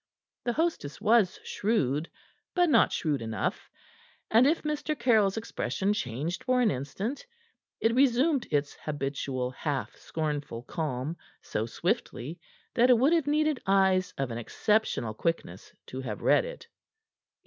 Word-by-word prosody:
The 240 - +1
hostess 320 - -1
was 215 -3 +3
shrewd, 160 - 0 0.5
but 355 -2 +4
not 230 - +5
shrewd 150 -5 -1
enough, 110 -3 -3 0.6
and 235 +4 +6
if 320 +3 +1
Mr. 300 0 -2
Caryll's 220 -5 +3
expression 195 - -1
changed 155 - -3
for 255 0 +2
an 235 -4 +4
instant, 190 - -4 0.5
it 225 - +2
resumed 265 +2 +3
its 145 -1 0
habitual 135 -3 -2
half 140 +1 -3
scornful 145 -7 -4
calm 150 +1 -3 0.3
so 110 +1 -2
swiftly 170 - -2 0.3
that 245 +1 +4
it 250 - +7
would 270 +8 +4
have 325 -4 +2
needed 305 -2 +2
eyes 190 -1 +3
of 135 -3 -2
an 115 - -3
exceptional 165 - 0
quickness 110 - -3
to 130 - -6
have 110 -5 -5
read - - +4
it. - - -9
190 Hz, 135 wpm, -29 LUFS, -, 0.6 s, it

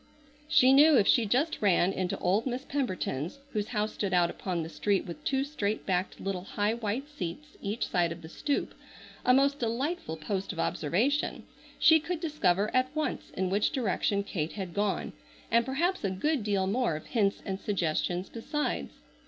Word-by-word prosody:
She 260 -3 +6
knew 295 +1 +7
if 205 - +4
she 230 0 +4
just 275 +10 +1
ran 190 -2 +3
into 185 -1 -2
old 200 +7 +1
Miss 255 +2 -3
Pemberton's, 185 - -2 0.2
whose 210 -1 -1
house 215 -2 -1
stood 195 -3 -1
out 175 -1 +3
upon 175 -4 -3
the - - -5
street 200 +3 0
with 170 -4 -8
two 270 0 +1
straight 220 -8 -2
backed 185 0 -1
little, 195 -2 -3
high, 205 +2 0
white 235 +4 -3
seats 295 - -7
each 210 +4 -2
side 175 -2 +1
of 170 0 -7
the - - -8
stoop, 285 - -2 0.5
a - - +4
most 275 +2 +4
delightful 240 - -2
post 190 +4 -3
of 175 - -8
observation, 225 - 0 0.3
she 320 0 +6
could 335 +2 -3
discover 215 - +1
at 255 0 +3
once 310 0 -2
in 185 0 0
which 205 +2 +2
direction 200 -4 0
Kate 165 -5 -3
had 190 -4 -5
gone, 205 -1 -1 0.4
and 235 +2 +3
perhaps 340 +8 0
a 195 - +1
good 260 +8 0
deal 200 -2 +1
more 210 -3 +1
of 155 - -7
hints 205 -5 0
and 190 -1 -3
suggestions 180 -1 -1
besides. 295 +6 -3
210 Hz, 180 wpm, -29 LUFS, 185-270 Hz, 0.5 s, knew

